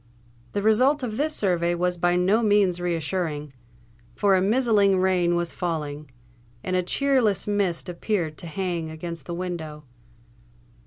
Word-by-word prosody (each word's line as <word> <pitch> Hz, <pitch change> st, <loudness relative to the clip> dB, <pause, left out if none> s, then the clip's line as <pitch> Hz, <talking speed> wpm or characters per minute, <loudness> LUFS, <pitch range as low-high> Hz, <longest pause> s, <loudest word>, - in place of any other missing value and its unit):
The 200 Hz, -, -1 dB
result 255 Hz, +7 st, +3 dB
of 220 Hz, -3 st, -3 dB
this 305 Hz, +2 st, 0 dB
survey 175 Hz, -3 st, +1 dB
was 180 Hz, +1 st, 0 dB
by 175 Hz, 0 st, +1 dB
no 190 Hz, +6 st, +3 dB
means 205 Hz, -5 st, +2 dB
reassuring; 160 Hz, -3 st, -2 dB, 0.6 s
for 200 Hz, -1 st, +3 dB
a 185 Hz, -, +2 dB
mizzling 205 Hz, -2 st, +3 dB
rain 180 Hz, -2 st, +2 dB
was 175 Hz, -1 st, -1 dB
falling, 150 Hz, -4 st, -4 dB, 0.5 s
and 185 Hz, -, -2 dB
a 185 Hz, -, +3 dB
cheerless 245 Hz, 0 st, +1 dB
mist 200 Hz, -5 st, -1 dB
appeared 175 Hz, -2 st, -2 dB
to 170 Hz, -, -8 dB
hang 175 Hz, -2 st, -3 dB
against 165 Hz, -1 st, -7 dB
the 170 Hz, -, -4 dB
window. 165 Hz, -4 st, -5 dB
180 Hz, 145 wpm, -24 LUFS, 170-205 Hz, 0.6 s, result